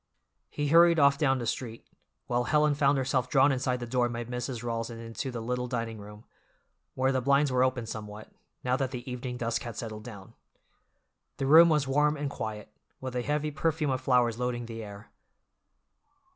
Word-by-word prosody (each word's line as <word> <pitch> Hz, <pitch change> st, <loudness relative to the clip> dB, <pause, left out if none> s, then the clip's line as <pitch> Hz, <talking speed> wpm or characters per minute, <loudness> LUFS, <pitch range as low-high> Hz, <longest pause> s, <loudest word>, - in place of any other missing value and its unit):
He 145 Hz, -1 st, -2 dB
hurried 170 Hz, +1 st, +6 dB
off 140 Hz, -1 st, +4 dB
down 135 Hz, -3 st, +2 dB
the 120 Hz, -, -4 dB
street, 115 Hz, 0 st, -4 dB, 0.4 s
while 120 Hz, 0 st, 0 dB
Helen 150 Hz, -1 st, +3 dB
found 140 Hz, 0 st, +2 dB
herself 130 Hz, -1 st, 0 dB
drawn 135 Hz, +1 st, +4 dB
inside 125 Hz, -1 st, -1 dB
the 120 Hz, -, -5 dB
door 120 Hz, 0 st, 0 dB
by 120 Hz, 0 st, -4 dB
Mrs. 125 Hz, 0 st, -5 dB
Rawls 115 Hz, -1 st, -3 dB
and 115 Hz, -1 st, -8 dB
into 115 Hz, +3 st, -5 dB
the 120 Hz, -2 st, -5 dB
little 125 Hz, +1 st, -2 dB
dining 115 Hz, -3 st, -4 dB
room, 105 Hz, +2 st, -12 dB, 0.7 s
where 130 Hz, +1 st, +2 dB
the 130 Hz, -1 st, 0 dB
blinds 140 Hz, +2 st, +3 dB
were 130 Hz, 0 st, +3 dB
open 130 Hz, -2 st, 0 dB
somewhat, 105 Hz, -1 st, -8 dB, 0.3 s
now 125 Hz, 0 st, +1 dB
that 135 Hz, -2 st, -1 dB
the 125 Hz, -1 st, -7 dB
evening 125 Hz, 0 st, -5 dB
dusk 115 Hz, -1 st, -2 dB
had 120 Hz, -3 st, -7 dB
settled 110 Hz, -2 st, -6 dB
down. 105 Hz, -5 st, -11 dB, 1.0 s
The 135 Hz, -, -2 dB
room 165 Hz, +4 st, +8 dB
was 150 Hz, -3 st, +2 dB
warm 150 Hz, +2 st, +2 dB
and 140 Hz, -1 st, -3 dB
quiet, 110 Hz, -4 st, -6 dB, 0.3 s
with 130 Hz, -1 st, -6 dB
a 125 Hz, -, 0 dB
heavy 150 Hz, +4 st, -1 dB
perfume 155 Hz, -1 st, 0 dB
of 130 Hz, -, -1 dB
flowers 120 Hz, -3 st, +2 dB
loading 125 Hz, -1 st, -2 dB
the 115 Hz, -1 st, -7 dB
air. 100 Hz, +1 st, -11 dB
125 Hz, 190 wpm, -28 LUFS, 115-140 Hz, 1.0 s, room